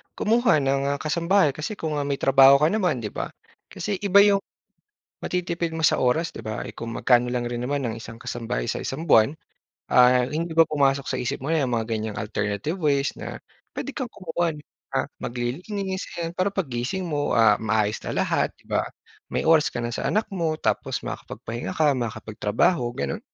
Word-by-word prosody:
kumuha 230 Hz, -5 st, +3 dB
ng, 135 Hz, 0 st, +1 dB
ah, -, -, -7 dB
kasambahay 170 Hz, +1 st, +2 dB
kasi 155 Hz, +8 st, -4 dB
kung, 160 Hz, -5 st, -3 dB
ah, 140 Hz, -, -2 dB
may 140 Hz, -, 0 dB
trabaho 135 Hz, 0 st, +7 dB
ka 155 Hz, -, +6 dB
naman, 180 Hz, -, +1 dB
'di 105 Hz, -, -4 dB
ba. -, -, -4 dB, 0.4 s
Kasi 200 Hz, -3 st, -3 dB
iba 200 Hz, -1 st, +5 dB
yung 200 Hz, -1 st, +4 dB, 0.8 s
matitipid 170 Hz, -2 st, -2 dB
mo 160 Hz, -, -2 dB
sa -, -, +4 dB
oras, 145 Hz, +7 st, +1 dB
'di -, -, -8 dB
ba? 110 Hz, -1 st, -4 dB
Eh, -, -, -7 dB
kung 115 Hz, 0 st, -5 dB
magkano 125 Hz, -1 st, +3 dB
lang 125 Hz, -1 st, -1 dB
rin 120 Hz, 0 st, -4 dB
naman 140 Hz, +1 st, -1 dB
ang 115 Hz, -2 st, -2 dB
isang 115 Hz, 0 st, -9 dB
kasambay 115 Hz, -, -3 dB
sa -, -, -2 dB
isang 150 Hz, +5 st, -4 dB
buwan. 145 Hz, -1 st, +4 dB, 0.6 s
Ah, 125 Hz, 0 st, +6 dB
hindi 165 Hz, +4 st, -3 dB
ba 165 Hz, -, +8 dB
pumasok 140 Hz, -2 st, +1 dB
sa -, -, -1 dB
isip 125 Hz, +3 st, -2 dB
mo -, -, -4 dB
'yang 145 Hz, -6 st, +1 dB
mga 115 Hz, -1 st, -1 dB
ganyang 110 Hz, -1 st, -4 dB
alternative 105 Hz, -, -2 dB
ways 140 Hz, -4 st, +1 dB
na -, -, -7 dB, 0.3 s
pwede 280 Hz, -, -5 dB
kang 250 Hz, -3 st, -4 dB
kumuha 170 Hz, -2 st, -2 dB
ng, 150 Hz, -, -12 dB, 0.3 s
ah, -, -, +1 dB, 0.2 s
maglilinis? 185 Hz, -, -3 dB, 0.2 s
'Yan, 165 Hz, 0 st, -2 dB
para 185 Hz, +2 st, +1 dB
paggising 165 Hz, 0 st, -2 dB
mo, 145 Hz, -2 st, -1 dB
ah, 110 Hz, -2 st, +5 dB
maayos 110 Hz, -1 st, 0 dB
na -, -, -4 dB
lahat, -, -, +1 dB
'di -, -, -25 dB
ba. -, -, +1 dB, 0.5 s
May -, -, -1 dB
oras 160 Hz, -1 st, +5 dB
ka -, -, -4 dB
na 120 Hz, 0 st, -3 dB
sa -, -, -2 dB
anak 215 Hz, +1 st, +1 dB
mo 165 Hz, -4 st, -1 dB
tapos -, -, -1 dB
makakapagpahinga 115 Hz, +2 st, -6 dB
ka, 155 Hz, -2 st, +4 dB
makakapagtrabaho, 110 Hz, -, 0 dB
gano'n. 70 Hz, -, -3 dB
140 Hz, 195 wpm, -24 LUFS, 120-170 Hz, 0.8 s, ba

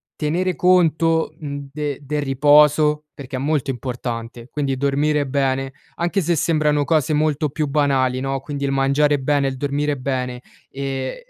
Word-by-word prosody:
tenere 175 Hz, +4 st, -1 dB
conto, 165 Hz, -2 st, +2 dB
mhmm, 140 Hz, -2 st, -6 dB
de 145 Hz, -2 st, -3 dB
del 145 Hz, +1 st, -2 dB
riposo 150 Hz, +2 st, +4 dB
perché 135 Hz, -1 st, -7 dB
è -, -, -3 dB
molto 145 Hz, 0 st, -1 dB
importante, 120 Hz, -1 st, -5 dB
quindi 140 Hz, -3 st, -2 dB
dormire 145 Hz, +2 st, +1 dB
bene, 135 Hz, -1 st, -1 dB, 0.2 s
anche 175 Hz, +4 st, 0 dB
se 170 Hz, 0 st, +1 dB
sembrano 150 Hz, -1 st, +2 dB
cose 155 Hz, -1 st, +1 dB
molto 150 Hz, 0 st, +1 dB
più 150 Hz, +2 st, -2 dB
banali, 135 Hz, -3 st, +1 dB
no, 135 Hz, 0 st, -2 dB
quindi 140 Hz, 0 st, -5 dB
il 140 Hz, -, 0 dB
mangiare 140 Hz, +2 st, +2 dB
bene, 140 Hz, +1 st, +1 dB
il 130 Hz, -, -6 dB
dormire 145 Hz, +1 st, -1 dB
bene, 125 Hz, -2 st, -3 dB, 0.3 s
ehm, 135 Hz, -1 st, -4 dB
145 Hz, 155 wpm, -21 LUFS, 135-150 Hz, 0.3 s, riposo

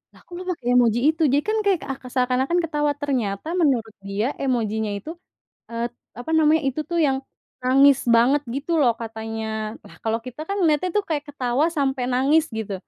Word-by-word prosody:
"Lah -, -, -17 dB
kok -, -, -35 dB
lo -, -, -6 dB
pakai 265 Hz, -8 st, -7 dB
emoji 235 Hz, -1 st, +3 dB
itu?" 320 Hz, -, -9 dB
Jadi 290 Hz, +1 st, +3 dB
kan 440 Hz, -, +1 dB
kayak 385 Hz, -4 st, +3 dB
ak 270 Hz, -, -7 dB
seakan-akan 260 Hz, +6 st, +1 dB
ketawa, 295 Hz, -2 st, 0 dB
ternyata 245 Hz, -5 st, -2 dB
menurut 245 Hz, -8 st, +1 dB, 0.2 s
dia 200 Hz, +4 st, -1 dB, 0.2 s
emojinya 220 Hz, -4 st, 0 dB
itu, 205 Hz, +10 st, -9 dB, 0.6 s
eee, 230 Hz, 0 st, -2 dB, 0.3 s
apa 245 Hz, +6 st, -5 dB
namanya, 315 Hz, 0 st, +4 dB
itu 270 Hz, +4 st, -1 dB
tuh 340 Hz, -1 st, 0 dB
yang 265 Hz, -1 st, +1 dB, 0.5 s
nangis 270 Hz, +1 st, +5 dB, 0.2 s
banget 260 Hz, +5 st, +4 dB
gitu 285 Hz, +5 st, -4 dB
loh 245 Hz, -, +5 dB
katanya. 225 Hz, 0 st, -5 dB, 0.4 s
Lah -, -, -15 dB
kalau 225 Hz, 0 st, 0 dB
kita 255 Hz, +4 st, -8 dB
kan 400 Hz, -, -1 dB
lihatnya 310 Hz, +4 st, +1 dB
tuh -, -, -3 dB
kayak 295 Hz, -2 st, -1 dB
ketawa 260 Hz, +2 st, 0 dB
sampai 270 Hz, -2 st, 0 dB
nangis 285 Hz, +5 st, +3 dB
gitu, 215 Hz, -2 st, -4 dB
265 Hz, 180 wpm, -23 LUFS, 230-300 Hz, 0.6 s, nangis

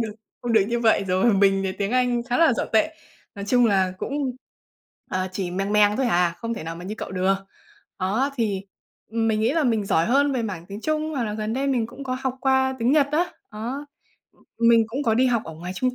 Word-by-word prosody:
được 220 Hz, -2 st, -2 dB, 0.3 s
không 240 Hz, -1 st, -1 dB
được 220 Hz, -, +6 dB
như 235 Hz, 0 st, 0 dB
vậy 220 Hz, -3 st, +3 dB
rồi, 190 Hz, +5 st, +3 dB
mình 195 Hz, 0 st, +3 dB
thì 190 Hz, -, -1 dB
tiếng 200 Hz, +1 st, -3 dB
Anh 245 Hz, -1 st, +2 dB
khá 245 Hz, +3 st, -1 dB
là 330 Hz, -5 st, +5 dB
dở -, -, -1 dB
tệ. 310 Hz, +9 st, +2 dB, 0.4 s
Nói 200 Hz, -, -6 dB
chung 245 Hz, +4 st, +4 dB
là 190 Hz, -3 st, +2 dB
cũng, 270 Hz, 0 st, -3 dB, 0.7 s
ờ, 185 Hz, 0 st, -1 dB
chỉ 185 Hz, -2 st, -3 dB
mèng 195 Hz, +3 st, -2 dB
mèng 210 Hz, 0 st, +4 dB
thôi 265 Hz, -1 st, +1 dB
hà, 175 Hz, -5 st, +2 dB
không 230 Hz, 0 st, -3 dB
thể 185 Hz, -, -7 dB
nào 165 Hz, +1 st, -5 dB
mà 175 Hz, -, -9 dB
như 205 Hz, -, -4 dB
cậu -, -, -5 dB
được. 190 Hz, +1 st, +1 dB, 0.6 s
Đó, 215 Hz, +9 st, 0 dB
thì 210 Hz, -5 st, 0 dB, 0.5 s
mình 225 Hz, -1 st, +1 dB
nghĩ 225 Hz, -, +2 dB
là 320 Hz, -1 st, +1 dB
mình 225 Hz, -5 st, +1 dB
giỏi 165 Hz, -3 st, +2 dB
hơn 280 Hz, +4 st, +3 dB
về 250 Hz, -3 st, -1 dB
mảng 185 Hz, -6 st, -5 dB
tiếng 200 Hz, +2 st, -8 dB
Trung 310 Hz, +3 st, -1 dB
hoặc 270 Hz, -6 st, -1 dB
là 210 Hz, -1 st, -3 dB
gần 215 Hz, 0 st, -3 dB
đây 270 Hz, +3 st, -1 dB
mình 250 Hz, -5 st, +1 dB
cũng 275 Hz, +4 st, -10 dB
có 255 Hz, -1 st, -2 dB
học 260 Hz, -1 st, -2 dB
qua 265 Hz, 0 st, +2 dB
tiếng 240 Hz, +3 st, +2 dB
Nhật 295 Hz, -2 st, +4 dB
á, 345 Hz, +4 st, +1 dB, 0.2 s
đó. 245 Hz, +7 st, -5 dB, 0.7 s
Mình 230 Hz, -1 st, +5 dB
cũng 255 Hz, +6 st, -3 dB
có 225 Hz, -5 st, +2 dB
đi 255 Hz, +3 st, +3 dB
học 235 Hz, -3 st, +1 dB
ở 160 Hz, -, -8 dB
ngoài 175 Hz, +3 st, -6 dB
trung 255 Hz, +6 st, -1 dB
230 Hz, 240 wpm, -24 LUFS, 200-260 Hz, 0.7 s, được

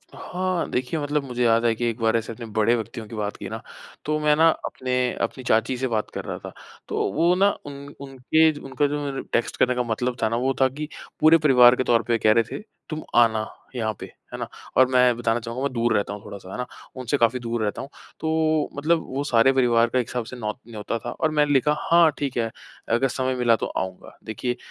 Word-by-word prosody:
हाँ। 185 Hz, -1 st, -2 dB
देखिए, 130 Hz, +6 st, -2 dB
मतलब 145 Hz, 0 st, -1 dB
मुझे 125 Hz, -2 st, -2 dB
याद 115 Hz, 0 st, +3 dB
है 115 Hz, -, +4 dB
कि 120 Hz, -, -2 dB
एक 115 Hz, +1 st, -5 dB
बार 110 Hz, 0 st, +2 dB
ऐसे 115 Hz, 0 st, -4 dB
अपने 115 Hz, +1 st, -8 dB
बड़े 110 Hz, +1 st, +2 dB
व्यक्तियों 110 Hz, 0 st, -5 dB
की 115 Hz, -, -9 dB
बात 105 Hz, -1 st, -3 dB
की -, -, -7 dB
ना, -, -, -6 dB, 0.4 s
तो 155 Hz, +1 st, 0 dB
मैं 150 Hz, 0 st, +3 dB
ना 165 Hz, +2 st, +5 dB, 0.2 s
अपने 130 Hz, 0 st, -3 dB, 0.3 s
अपनी 130 Hz, -, -3 dB
चाची 115 Hz, +2 st, +1 dB
से 130 Hz, +1 st, -1 dB
बात 110 Hz, -3 st, -1 dB
कर -, -, -5 dB
रहा -, -, -4 dB
था। -, -, -8 dB, 0.3 s
तो -, -, -1 dB
वो 170 Hz, -, +3 dB
ना 200 Hz, +2 st, +4 dB, 0.2 s
उन 140 Hz, 0 st, -9 dB
उनके 140 Hz, +4 st, +2 dB
ज 150 Hz, -, -10 dB
उनका 145 Hz, +2 st, +2 dB
जो 145 Hz, 0 st, -3 dB
मतलब 135 Hz, -1 st, -5 dB
टेक्स्ट 120 Hz, -, 0 dB
करने 125 Hz, 0 st, +2 dB
का 125 Hz, -, 0 dB
मतलब 120 Hz, +2 st, -2 dB
था 110 Hz, -, +3 dB
ना, 115 Hz, -, -1 dB
वो 130 Hz, +3 st, +1 dB
था 130 Hz, -, +6 dB
कि 150 Hz, +4 st, -6 dB, 0.3 s
पूरे 160 Hz, +1 st, +7 dB
परिवार 125 Hz, -5 st, +6 dB
के 130 Hz, -, 0 dB
तौर 120 Hz, -2 st, +3 dB
पे 120 Hz, -, -1 dB
ये 115 Hz, -, +2 dB
कह 110 Hz, -, +4 dB
रहे 115 Hz, +1 st, +4 dB
थे, -, -, -9 dB, 0.3 s
"तुम 155 Hz, 0 st, -4 dB
आना 110 Hz, -2 st, +4 dB, 0.3 s
यहाँ 110 Hz, -3 st, -1 dB
पे", -, -, -6 dB
है -, -, -12 dB
ना। -, -, -3 dB, 0.3 s
और 130 Hz, -1 st, +7 dB
मैं 125 Hz, -1 st, +4 dB
बताना 120 Hz, -1 st, 0 dB
चाहूँगा 120 Hz, +3 st, -5 dB
मैं 140 Hz, -, 0 dB
दूर 120 Hz, -1 st, +1 dB
रहता 100 Hz, 0 st, 0 dB
हूँ 105 Hz, -, -9 dB
थोड़ा-सा, 95 Hz, -2 st, -9 dB
है -, -, -6 dB
ना, 125 Hz, -, -2 dB, 0.3 s
उनसे 130 Hz, +2 st, -1 dB
काफ़ी 120 Hz, 0 st, +2 dB
दूर 120 Hz, -1 st, -3 dB
रहता 105 Hz, -, -2 dB
हूँ। 135 Hz, -, -8 dB, 0.3 s
तो 160 Hz, -1 st, +1 dB
मतलब 160 Hz, +3 st, +1 dB
वो 135 Hz, +2 st, -3 dB
सारे 125 Hz, -2 st, +4 dB
परिवार 120 Hz, -3 st, +3 dB
का 130 Hz, -, +1 dB
एक 120 Hz, -, -2 dB
हिसाब 125 Hz, -2 st, -3 dB
से 125 Hz, -, -9 dB
नौ 110 Hz, -4 st, -3 dB, 0.2 s
न्योता 110 Hz, 0 st, -4 dB
था, 120 Hz, -, -5 dB
और 160 Hz, +4 st, -1 dB
मैंने 150 Hz, -1 st, +2 dB
लिखा, 150 Hz, +2 st, +3 dB
"हाँ, 170 Hz, -1 st, +4 dB
ठीक 140 Hz, -4 st, -3 dB
है, 115 Hz, -1 st, 0 dB, 0.4 s
अगर 120 Hz, +4 st, +2 dB
समय 130 Hz, 0 st, -1 dB
मिला 120 Hz, -2 st, +3 dB
तो -, -, -3 dB
आऊँगा"। 95 Hz, -1 st, -5 dB
देखिए 120 Hz, +3 st, -3 dB
125 Hz, 245 wpm, -24 LUFS, 115-145 Hz, 0.4 s, पूरे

